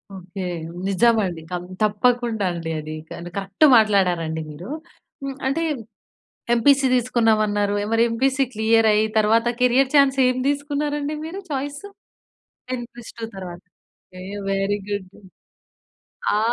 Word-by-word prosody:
Okay. 185 +1 -7 0.4
నిజం 230 +5 +4
అండి. 170 -3 -5
కం 175 -1 -3 0.2
తప్పకుండా 225 0 +1
అండి 165 -1 -5
అది 155 0 -6 0.2
కానీ 175 +1 -7
కరెక్ట్ 195 +9 +2
మాట్లాడారండి 180 -7 +2
మీరు. 170 - -9 0.5
హ్మ్. 275 -1 -4
అంటే 280 +5 0 0.9
ఎంపీసీ 275 +3 +4
తీసుకున్నాం 235 -3 +2
అన్నారు 205 0 0 0.2
మరి 225 0 +4
ఎంపీసీ 265 +3 +1
క్లియర్ 220 +1 +3
అయ్యి 210 +1 +3
తర్వాత 225 +2 +3
కెరియర్ 255 +2 +3
చాన్స్ 275 -1 +5
ఏం 255 - 0
తీసుకున్నారండి 290 +1 -1
మీరు 360 +5 -6
చాయిసు? 285 +6 -4 0.8
10+2 240 -2 -7
తర్వాత. 180 -2 -8 0.6
A - - -8 0.3
very 195 +1 0
good. 200 -2 -3 1.3
ఆ! - - +2
225 Hz, 120 wpm, -22 LUFS, 195-265 Hz, 1.3 s, చాన్స్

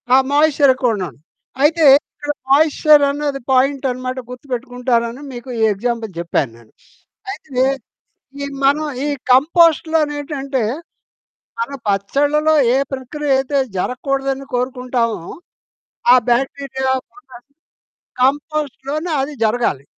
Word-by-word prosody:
ఆ! 255 - +6 0.2
మాయిశ్చర్ 290 -1 +4
ఎక్కువన్నాను. 225 -8 -2 0.5
అయితే 320 +2 +4 0.3
ఇక్కడ 295 0 -4 0.2
మాయిశ్చర్ 300 +1 +5
అనేది 285 -1 -3
పాయింటన్నమాట 255 -1 0
గుర్తుపెట్టుకుంటారని, 250 -1 -2
మీకు 245 +1 -9
ఈ - - 0
ఎగ్జాంపుల్ 230 +1 -3
జెప్పాను 170 -7 -1
నేను. 115 -2 -20 0.6
అయితే 270 -10 -2 0.8
ఈ - - -2 0.2
మనం 295 +3 +3 0.2
ఈ - - 0 0.2
కంపోస్ట్‌లో 320 +3 +4
నేటంటే, 275 -3 -3 1.0
మన 465 - -2 0.2
పచ్చడ్ల‌లో 285 +10 +1 0.2
ఏ - - +3 0.2
ప్రక్రియ 280 +3 -5
అయితే 275 +1 0 0.2
జరగకూడదని 270 +4 -2
కోరుకుంటామో, 250 -3 -1 0.9
ఆ - - +8
బాక్టీరియా 265 +1 0 0.2
పుట్టాలి. 260 -12 -16 0.8
కంపోస్ట్‌లోనే 295 +3 -1
అది 290 +2 -5
జరగాలి. 220 - 0
270 Hz, 100 wpm, -18 LUFS, 245-290 Hz, 1.0 s, ఆ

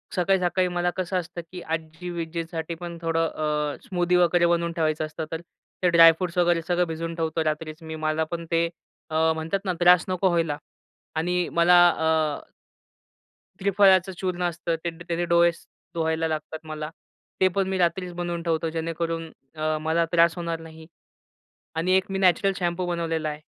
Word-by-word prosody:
सकाळी-सकाळी 185 0 +2
मला 175 0 0
कसं 185 0 -1
असतं 175 0 -7
की 180 -1 -7
आजी-विज्जींसाठी 165 0 -4
पण 170 0 -7
थोडं 165 0 +1
अ, 150 -1 -2
स्मूदी 180 -1 +1
वगैरे 175 -1 +4
बनवून 170 0 +1
ठेवायचं 155 -2 0
असतं. 155 +1 -6
तर 165 0 -4 0.4
ते 180 - +5
ड्राय-फ्रूट्स 170 +1 +5
वगैरे 175 -1 +3
सगळं 175 -1 +1
भिजवून 165 +1 -4
ठेवतो 160 -1 -1
रात्रीच 155 +1 -3
मी, 160 0 -6
मला 155 0 0
पण 170 -1 -4
ते 165 0 +3 0.4
अ, 160 +1 +2
म्हणतात 160 +5 -2
ना 185 - 0
त्रास 175 0 +6
नको 185 +1 +1
व्हायला. 165 -4 0 0.6
आणि 175 +2 0
मला 170 +1 +5
अ, 160 -3 0 1.2
त्रिफळाच 195 -1 +4
चूर्ण 180 -1 -2
असतं 170 -1 -1
ते 170 - 0
द 165 +1 -11
त्यानी 175 0 -1
डोळे 170 0 +4
सु 170 - -17 0.3
धुवायला 160 0 0
लागतात 155 0 -4
मला. 155 0 -5 0.5
ते 190 - +6
पण 195 -1 +1
मी 190 - -1
रात्रीच 180 0 0
बनवून 175 -1 -3
ठेवतो 165 -1 0
जेणेकरून 165 0 -3 0.2
अ, 155 0 -1
मला 160 +2 +1
त्रास 170 -1 +4
होणार 170 -1 -3
नाही. 160 0 -12 0.9
आणि 165 +3 0
एक 190 - 0
मी 195 - -1
नॅचरल 190 +1 +3
शॅम्पू 175 0 -1
बनवलेला 165 -2 -1
आहे. 150 0 -7
170 Hz, 165 wpm, -25 LUFS, 160-175 Hz, 1.2 s, त्रास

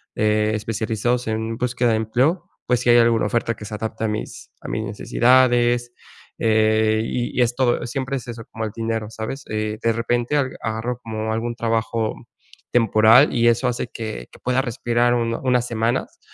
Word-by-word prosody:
eh, 105 0 +1
especializados 110 +3 -1
en 110 +1 -2
búsqueda 125 -1 0
de 110 - +2
empleo, 130 - 0 0.2
pues 125 -1 +2
si 120 - 0
hay 120 - +7
alguna 115 -2 +3
oferta 115 +1 0
que 105 - -10
se 110 - -6
adapte 110 +1 -4
a - - +1
mis 105 - -6
a - - -9
mis 110 - -2
necesidades, 120 +3 +2 0.5
eh, 110 0 +3
y 120 +1 -3
y - - +5
es 120 0 -1
todo, 120 -2 +1
siempre 135 +2 -3
es 125 - -9
eso 115 -2 -7
como 110 0 -4
el 110 - -4
dinero, 115 -1 -2
¿sabes? 115 +5 -6
Eh, 110 0 -2
de 115 0 +2
repente, 120 +4 0
agarro 120 -3 -3
como 110 -1 -3
algún 120 +1 -2
trabajo 115 -1 -1 0.6
temporal, 115 +3 +5
y 120 -1 +3
eso 120 +2 +3
hace 125 -1 -1
que 110 - -6
que - - -16
pueda 125 +1 +1
respirar 120 -1 +1
un 115 -1 0
unas 125 -2 +2
semanas, 115 +1 -2
115 Hz, 180 wpm, -22 LUFS, 110-120 Hz, 0.6 s, hay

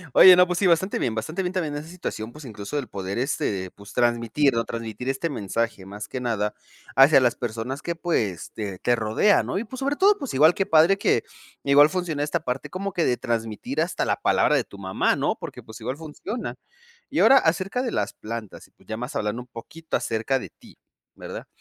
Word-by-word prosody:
Oye, 185 -1 +10
no, 180 0 +6
pues 180 -1 -2
sí, 195 - +3
bastante 180 +3 +2
bien, 115 - -1
bastante 155 - -3
bien 180 -1 -2
también 165 -6 -2
esa 145 +2 -5
situación, 120 -10 -6
pues, 150 - -11
incluso 110 +1 -6
el 140 -4 -3
poder, 95 +1 -4
este, 100 -8 -1
pues, 100 0 -14
transmitir, 120 +3 +2
¿no?, 115 0 0
transmitir 115 +1 -6
este 135 +5 -1
mensaje 115 -4 -2
más 105 +2 -8
que 130 - -4
nada 110 -4 -1 0.4
hacia 135 +1 +7
las 125 -2 +2
personas 120 +4 -4
que, 170 - -3
pues, 110 - -2
te 100 -4 -5
te 120 +2 +2
rodean, 110 - +3
¿no? - - -2
Y 205 - -1
pues, 245 +3 -9
sobre 280 +2 0
todo, 400 +5 +4
pues, 275 - -5
igual 155 +5 +6
qué 195 - 0
padre, 165 +4 +5
que 200 - +2 0.4
igual 145 +2 +6
funciona 170 -5 -2
esta 150 - -1
parte 125 +1 -4
como 195 +2 -4
que 175 -2 0
de 125 - +2
transmitir 115 +3 -3
hasta 170 +2 0
la - - 0
palabra - - +3
de - - +1
tu 100 - -13
mamá, 95 -1 0
¿no?, - - 0
porque, - - -8
pues, 110 0 -11
igual 130 - -3
funciona. 165 - -6 0.5
Y - - -1
ahora 270 - +7
acerca 185 +6 +1
de 250 -2 -2
las 105 -1 -1
plantas, 110 -2 -7
y - - -33
pues, - - -26
ya 110 - -4
más 125 +5 -6
hablando 105 +3 -2
un 125 - -13
poquito 155 +7 -7
acerca 115 +4 0
de - - -8
ti, - - -19 0.4
¿verdad? - - -8
135 Hz, 220 wpm, -24 LUFS, 110-170 Hz, 0.5 s, Oye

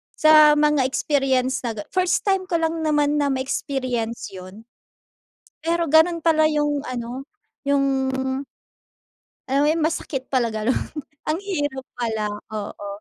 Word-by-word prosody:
sa 305 -1 +7
mga 300 -2 +3
experience 265 -2 +1
na 230 -2 -3
ga - - -4
first 370 -1 +1
time 385 -1 +2
ko 345 - -1
lang 325 0 -1
naman 295 -1 +2
na 285 - +2
ma-experience 255 -5 -3
‘yon. 185 +3 -11 1.0
Pero 335 0 0
ganun 335 +2 +5
pala 315 -2 +4
yung 295 -2 0
ano, 250 +2 -5 0.4
yung 280 -1 +3 1.7
Alam 275 +1 +3
mo - - +3
yung 325 -1 -1
masakit 285 -4 -3
pala 255 -3 +2
ganun. 220 +4 0 0.5
Ang 315 - +1
hirap 290 -8 -2
pala, 220 -3 -2 0.2
oo. 205 -1 -6
280 Hz, 135 wpm, -22 LUFS, 250-310 Hz, 1.7 s, sa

